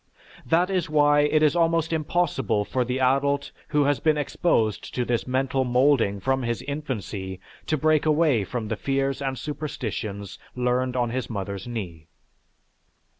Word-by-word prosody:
That 175 +7 +2
is 185 -3 0
why 145 -1 +4
it 150 +1 +3
is 155 +2 +4
almost 165 -1 +2
impossible 155 -9 0
for 130 +3 0
the 125 +2 -2
adult 140 +2 +1 0.2
who 150 -1 +2
has 145 0 +1
been 155 -1 +2
exposed 115 - 0
to 125 - 0
this 120 0 -1
mental 130 +1 0
moulding 125 -5 +2
from 130 +6 0
his 120 -1 -2
infancy 105 -10 -5 0.3
to 155 - +1
break 155 +1 +2
away 150 -8 +3
from 110 +3 -4
the 110 - -2
fears 135 +1 -1
and 135 -1 -2
superstitions 110 -10 -5 0.2
learned 125 0 0
on 120 -2 0
his 130 +1 -3
mother's 100 -2 -5
knee. 90 -9 -6
130 Hz, 155 wpm, -25 LUFS, 115-150 Hz, 0.3 s, why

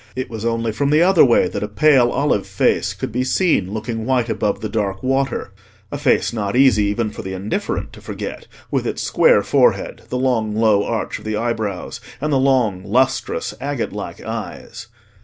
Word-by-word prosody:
It 130 -1 -4
was 110 -1 -6
only 115 -1 0
from 140 +6 -1
the 155 +3 +4
other 185 -1 +6
way 120 -8 +4
that 100 - -5
a 105 - -2
pale 125 +3 +4
olive 120 -7 0
face - - +1
could - - -5
be 125 +3 -1
seen 130 - +1
looking 110 +1 -4
white 125 -3 +1
above 105 -2 -1
the 110 - -2
dark 100 -3 -2
water: 135 -5 -1 0.4
a 145 - -3
face 140 -4 +2
not 105 -2 -2
easy 125 -6 +5
even 105 +2 -1
for - - -7
the 95 -2 -6
indifferent 105 - -3
to - - -13
forget, - - -7 0.2
with - - 0
its - - -3
square 485 0 +4
forehead, - - +1
the 125 - -2
long 115 -5 0
low 110 -2 +3
arch 115 0 -3
of - - -15
the 110 -1 -2
eyebrows, 110 -5 -3 0.2
and 150 +1 -1
the 135 - +3
long 125 -9 +2
lustrous 125 +3 0
agate 140 -3 -3
like - - -6
eyes. - - -7
115 Hz, 195 wpm, -20 LUFS, 105-135 Hz, 0.4 s, other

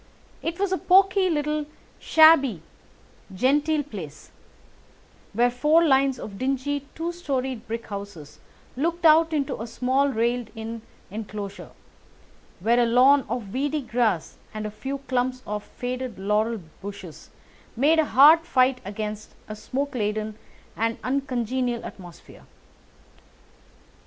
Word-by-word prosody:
It 335 +2 -4
was 400 -1 0
a 375 - 0
poky, 380 0 +4
little, 300 -1 -1 0.3
shabby 280 - +5 0.7
genteel 295 +7 +2
place, 180 - -10 1.0
where 240 +3 +3
four 300 +7 +3
lines 270 -2 +3
of 200 -4 -8
dingy 275 +2 -2
two 335 +2 -3
storied 265 -8 -4
brick 230 0 -4
houses 200 -8 -9 0.4
looked 335 +5 -2
out 320 +1 +6
into 285 -7 -2
a 230 - -5
small 260 +4 +1
railed 235 -1 -1
in 225 +1 -6 0.3
enclosure, 205 -1 -7 0.9
where 235 +5 +3
a 240 - +4
lawn 260 +3 +5
of 225 -4 -4
weedy 290 +3 -1
grass 230 -8 -1 0.2
and 215 0 -4
a 210 - -4
few 270 +6 -5
clumps 255 0 -1
of 210 0 -4
faded 250 -1 -5
laurel 210 +3 0 0.2
bushes 195 -5 -9 0.5
made 295 +7 +3
a 315 - +3
hard 295 +5 +7
fight 265 -5 +1
against 210 +1 -6
a 215 - -6
smoke 275 +6 -4
laden 215 -2 -2 0.4
and 230 +2 -1
uncongenial 255 -2 -2
atmosphere. 175 -3 -12
250 Hz, 125 wpm, -24 LUFS, 215-285 Hz, 1.0 s, hard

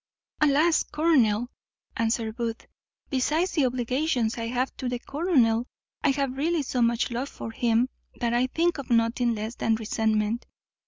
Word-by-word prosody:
"Alas! 300 +3 +4
colonel," 245 -8 +2 0.4
answered 225 -1 -1
Booth, 230 -1 -4 0.5
"besides 305 +7 +1
the 290 -7 +2
obligations 250 -1 0
I 230 -1 -3
have 250 +2 -1
to 255 - -3
the 245 - -2
colonel, 250 -5 +1 0.4
I - - +4
have 275 -1 -1
really 320 +2 +1
so 250 -2 -1
much 235 +1 +2
love 250 +4 -3
for 225 - -7
him, 230 +1 +2 0.3
that 235 -1 -1
I 245 +2 +2
think 335 +4 0
of 275 - -7
nothing 235 0 +2
less 215 +2 -4
than 225 -2 +1
resentment. 220 +1 -1
245 Hz, 155 wpm, -26 LUFS, 230-280 Hz, 0.5 s, Alas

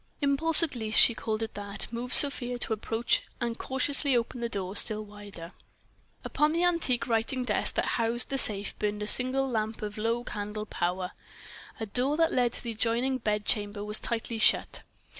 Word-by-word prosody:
Impulse, 300 +4 +1
at 325 - -1
least 220 -2 +2
she 235 - +9
called 225 -1 -4
it 225 - -6
that, 200 0 -4
moved 240 +2 -2
Sofia 250 -4 +5
to 240 - -3
approach 225 +2 -1 0.2
and 235 -1 -4
cautiously 265 0 +1
open 235 +1 -4
the 235 - -3
door 195 -2 -4
still 215 0 +6
wider. 205 -5 -11 0.7
Upon 300 +1 0
the 340 +1 0
antique 310 -10 0
writing 235 +3 -1
desk 215 -4 -2
that - - 0
housed 235 +2 0
the 270 - +1
safe 205 -3 +2
burned 210 0 -3
a - - -3
single 255 +5 +2
lamp 220 -3 -4
of 210 0 -6
low 230 +2 -2
candle 210 -1 -6
power. 180 -1 -3 0.7
A 220 - -4
door 255 +8 +1
that 330 0 +1
led 245 -2 +1
to - - -4
the 235 - -5
adjoining 240 +4 -1
bedchamber 210 -1 -1
was 210 +1 -1
tightly 230 -1 -4
shut. - - +2
230 Hz, 180 wpm, -27 LUFS, 210-255 Hz, 0.7 s, she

